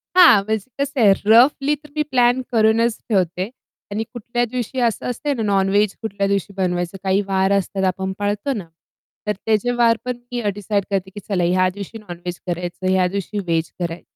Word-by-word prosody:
हां. 265 - +8
म्हणजे 220 +2 -2
कसं 280 -1 -1
आहे 200 -3 +7
रफली 270 +6 +5
तर 300 +1 -18
मी 305 - +1
प्लॅन 245 0 +3
करूनच 225 0 +3
ठेवते. 185 -1 0 0.4
आणि 215 +2 -1
कुठल्या 240 0 -2
दिवशी 250 +2 -4
असं 225 - -3
असते 285 +4 -2
ना, 245 - -3
नॉनवेज 200 0 +2
कुठल्या 200 -2 -1
दिवशी 200 0 -1
बनवायचं 180 0 -1
काही 190 +1 +2
वार 190 0 +1
असतात 195 0 0
आपण 190 +1 -2
पाळतो 205 +7 -1
ना? 195 -7 -6 0.6
तर 210 - +2
त्याचे 220 +2 +2
वार 230 -1 +4
पण 250 -1 -2
मी 245 -1 -2
डिसाईड 205 0 -1
करते, 190 -1 -1
की 205 - -9
चला 185 -4 +1
ह्या 185 +2 +3
दिवशी 205 +3 -7
नॉनवेज 175 -4 -7
करायचं, 175 +1 -3
ह्या 185 -1 +3
दिवशी 200 +2 -3
वेज 165 -1 0
कराय 170 -1 -3
205 Hz, 180 wpm, -21 LUFS, 190-235 Hz, 0.6 s, हां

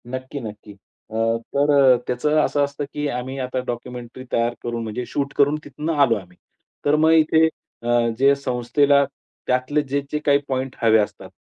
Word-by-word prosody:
नक्की 130 +3 -6
नक्की. 105 -3 -9
अ, 100 +2 -23 0.4
तर 145 +1 +3 0.2
अ, - - +2
त्याचं 150 +5 +1
असं 145 -1 +1
असतं 140 +1 -3
की 150 0 -2
आम्ही 130 +1 -4
आता 130 0 -2
डॉक्युमेंटरी 125 +1 -6
तयार 115 +1 +1
करून 120 -1 -3
म्हणजे 115 +3 -4
शूट 140 -1 -3
करून 145 +1 +4
तिथनं 150 +4 -4
आलो 120 -4 +3
आम्ही. 90 -3 -10 0.5
तर 145 +1 +4
मग 160 +1 +4
इथे 160 0 +5 0.4
अ, - - -5 0.3
जे 135 +2 +5
संस्थेला 140 +2 +2 0.4
त्यातले 130 +4 +1
जे-जे 140 +1 -3
काही 140 -1 +5
पॉइंट 130 -1 -3
हवे 110 -1 +5
असतात 100 -2 -3
130 Hz, 170 wpm, -22 LUFS, 120-145 Hz, 0.5 s, इथे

